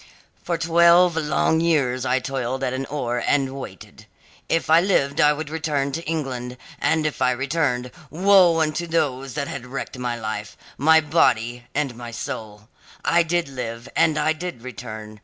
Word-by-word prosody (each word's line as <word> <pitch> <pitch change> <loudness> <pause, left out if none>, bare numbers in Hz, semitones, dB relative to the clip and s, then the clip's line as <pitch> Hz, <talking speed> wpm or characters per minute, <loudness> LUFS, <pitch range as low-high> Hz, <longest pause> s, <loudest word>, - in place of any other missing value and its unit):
"For 170 - -2
twelve 170 +1 +5
long 160 0 +1
years 135 -6 +1
I 130 - +2
toiled 130 0 -3
at 130 -1 -1
an 135 0 -3
oar, 120 -5 -2
and 135 -2 +1
waited. 95 -9 -11 0.4
If 165 - +1
I 160 +1 +6
lived 145 -7 +1
I 150 - +6
would 150 0 -4
return 150 -3 -1
to 165 +5 -4
England; 130 -6 -4 0.2
and 160 -1 +1
if 150 -3 -3
I 125 - +4
returned, 130 -1 -1 0.2
woe 180 0 +5
unto 160 +2 -1
those 135 -5 -1
that 140 -2 -2
had 125 -3 -6
wrecked 130 0 -6
my 120 -1 -3
life 105 -1 -5 0.2
my 160 +3 +5
body 120 -6 +1
and 140 -3 0
my 120 0 -8
soul. 110 -2 -7 0.4
I 170 +5 +4
did 170 0 0
live, 120 -2 -6
and 155 -1 +3
I 150 +1 +2
did 160 -7 -7
return. 110 -3 -8
140 Hz, 170 wpm, -23 LUFS, 125-160 Hz, 0.4 s, I